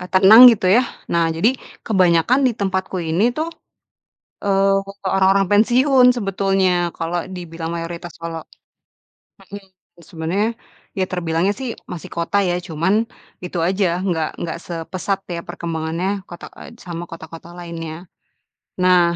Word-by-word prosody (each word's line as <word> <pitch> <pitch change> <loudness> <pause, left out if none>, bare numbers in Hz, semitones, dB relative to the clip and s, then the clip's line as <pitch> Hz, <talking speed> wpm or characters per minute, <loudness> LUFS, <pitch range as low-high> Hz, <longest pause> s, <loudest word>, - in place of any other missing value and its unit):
eee, 180 - -8
tenang 200 +6 +8
gitu, 200 - -4
ya. - - +6 0.3
Nah, 170 -1 +3
jadi, 220 +10 +3 0.3
kebanyakan 185 +4 +3
di 245 - +2
tempatku 190 -1 -2
ini 175 +9 +1
tuh, 320 +2 -1 1.0
eee, 195 0 +3 0.3
orang-orang 195 0 +3
pensiun 250 +5 +4
sebetulnya. 195 -3 +1 0.3
Kalau 165 +2 -2 0.2
dibilang, 165 -2 -6
mayoritas 170 0 -6
kalau 165 -1 -5 1.0
hmm, 195 +1 -11 0.4
sebenarnya, 170 +6 -1 0.5
ya 190 - +2
terbilangnya 175 +2 0
sih 260 -2 -4 0.2
masih 175 -3 -7
kota 170 +4 -1
ya, 175 - 0
cuman, 165 +4 0 0.5
itu 180 0 -5
aja, 190 +1 +1 0.2
nggak 160 -3 0
nggak 165 0 -4
sepesat, 180 +3 -3 0.2
ya - - -3
perkembangannya 165 +2 -3 0.2
kota 175 - -9
eee, 235 - -11
sama 170 -1 -5
kota-kota 165 0 -10
lainnya. 165 -2 -6 0.9
Nah. 180 -1 +5
180 Hz, 130 wpm, -20 LUFS, 165-195 Hz, 1.0 s, tenang